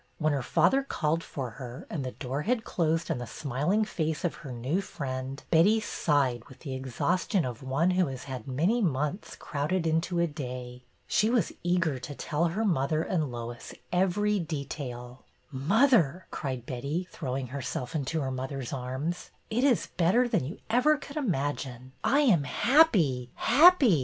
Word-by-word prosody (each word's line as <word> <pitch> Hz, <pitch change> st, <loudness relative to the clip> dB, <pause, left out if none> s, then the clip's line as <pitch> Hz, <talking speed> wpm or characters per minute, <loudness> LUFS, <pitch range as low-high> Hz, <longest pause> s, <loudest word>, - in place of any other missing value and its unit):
When 155 Hz, -2 st, +1 dB
her 140 Hz, -, 0 dB
father 175 Hz, -, +3 dB
called 165 Hz, -, -1 dB
for 130 Hz, -4 st, -5 dB
her 125 Hz, +2 st, -8 dB
and 150 Hz, -5 st, -4 dB
the 130 Hz, -, -4 dB
door 135 Hz, +1 st, -3 dB
had 230 Hz, +5 st, 0 dB
closed 165 Hz, -3 st, 0 dB
on -, -, -1 dB
the 120 Hz, -, -5 dB
smiling 150 Hz, -, 0 dB
face 160 Hz, -4 st, -2 dB
of 175 Hz, -, 0 dB
her 135 Hz, -, -7 dB
new 130 Hz, +10 st, -1 dB
friend, 135 Hz, -6 st, -5 dB
Betty 185 Hz, +7 st, +5 dB
sighed 140 Hz, -, 0 dB
with 130 Hz, -, -16 dB
the 135 Hz, -4 st, -5 dB
exhaustion 160 Hz, -, 0 dB
of 120 Hz, -3 st, -5 dB
one 135 Hz, +7 st, +1 dB
who 180 Hz, -2 st, +2 dB
has 130 Hz, -2 st, -6 dB
had 130 Hz, -1 st, -7 dB
many 170 Hz, -, +1 dB
months 150 Hz, +2 st, -1 dB
crowded 165 Hz, +4 st, -2 dB
into 165 Hz, +2 st, 0 dB
a 170 Hz, -, +3 dB
day. 125 Hz, -5 st, -6 dB, 0.2 s
She 215 Hz, -, +2 dB
was 240 Hz, -2 st, +2 dB
eager 170 Hz, -6 st, +1 dB
to 145 Hz, +3 st, -7 dB
tell 150 Hz, +4 st, -1 dB
her 195 Hz, +7 st, 0 dB
mother 155 Hz, -3 st, +1 dB
and 155 Hz, -8 st, -1 dB
Lois 120 Hz, 0 st, -7 dB, 0.2 s
every 195 Hz, +3 st, +2 dB
detail. 135 Hz, -6 st, -5 dB, 0.2 s
'' -, -, -38 dB, 0.2 s
Mother," 205 Hz, -, +4 dB
cried 130 Hz, -4 st, -4 dB
Betty, 140 Hz, +9 st, -3 dB
throwing 130 Hz, -4 st, -4 dB
herself 130 Hz, -2 st, -4 dB
into 155 Hz, +1 st, -1 dB
her 135 Hz, -1 st, -2 dB
mother's 130 Hz, 0 st, -4 dB
arms, 135 Hz, +7 st, -3 dB, 0.2 s
it 240 Hz, +4 st, +1 dB
is 265 Hz, -6 st, +3 dB
better 190 Hz, +9 st, +4 dB
than 215 Hz, -, +1 dB
you 160 Hz, +9 st, -6 dB
ever 255 Hz, +7 st, +4 dB
could 285 Hz, 0 st, -10 dB
imagine! 140 Hz, -, -2 dB
I 280 Hz, +3 st, +4 dB
am 185 Hz, -, +4 dB
happy, 175 Hz, -, +3 dB
happy! 275 Hz, -, +6 dB
155 Hz, 170 wpm, -28 LUFS, 130-185 Hz, 0.2 s, happy